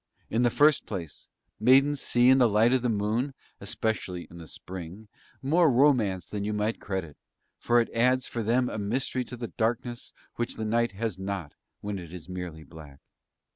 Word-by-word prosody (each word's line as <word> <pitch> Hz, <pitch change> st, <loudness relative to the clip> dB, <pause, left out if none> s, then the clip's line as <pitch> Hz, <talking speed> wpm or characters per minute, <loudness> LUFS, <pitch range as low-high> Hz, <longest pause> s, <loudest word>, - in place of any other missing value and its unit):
In 115 Hz, -, +2 dB
the 120 Hz, -, +4 dB
first 150 Hz, +5 st, +3 dB
place 90 Hz, -7 st, -7 dB, 0.3 s
maidens 135 Hz, +5 st, +4 dB
see 120 Hz, +1 st, +3 dB
in 130 Hz, +1 st, +6 dB
the 120 Hz, -2 st, +5 dB
light 110 Hz, +4 st, +4 dB
of 130 Hz, -, +2 dB
the 125 Hz, -, 0 dB
moon, 115 Hz, +6 st, -1 dB, 0.2 s
especially 95 Hz, -5 st, -3 dB
in 85 Hz, -, -11 dB
the 80 Hz, -, -10 dB
Spring, 90 Hz, +5 st, -9 dB, 0.4 s
more 160 Hz, +4 st, +4 dB
romance 120 Hz, -, +3 dB
than 105 Hz, -1 st, -4 dB
you 105 Hz, +1 st, -2 dB
might 105 Hz, +2 st, -1 dB
credit, 95 Hz, -7 st, -4 dB, 0.4 s
for 120 Hz, 0 st, +3 dB
it 115 Hz, -, 0 dB
adds 125 Hz, +2 st, +2 dB
for 115 Hz, -, -4 dB
them 120 Hz, +3 st, +2 dB
a 110 Hz, -, -4 dB
mystery 125 Hz, +5 st, -1 dB
to 125 Hz, -, -8 dB
the 120 Hz, -1 st, -5 dB
darkness 120 Hz, +1 st, -2 dB, 0.3 s
which 120 Hz, -, -2 dB
the 110 Hz, -, -4 dB
night 115 Hz, 0 st, +1 dB
has 105 Hz, -2 st, -3 dB
not 95 Hz, -6 st, -4 dB, 0.3 s
when 100 Hz, -1 st, -4 dB
it 85 Hz, -3 st, -10 dB
is 85 Hz, -3 st, -9 dB
merely 90 Hz, -4 st, -6 dB
black. 75 Hz, -4 st, -13 dB
110 Hz, 185 wpm, -27 LUFS, 95-125 Hz, 0.4 s, in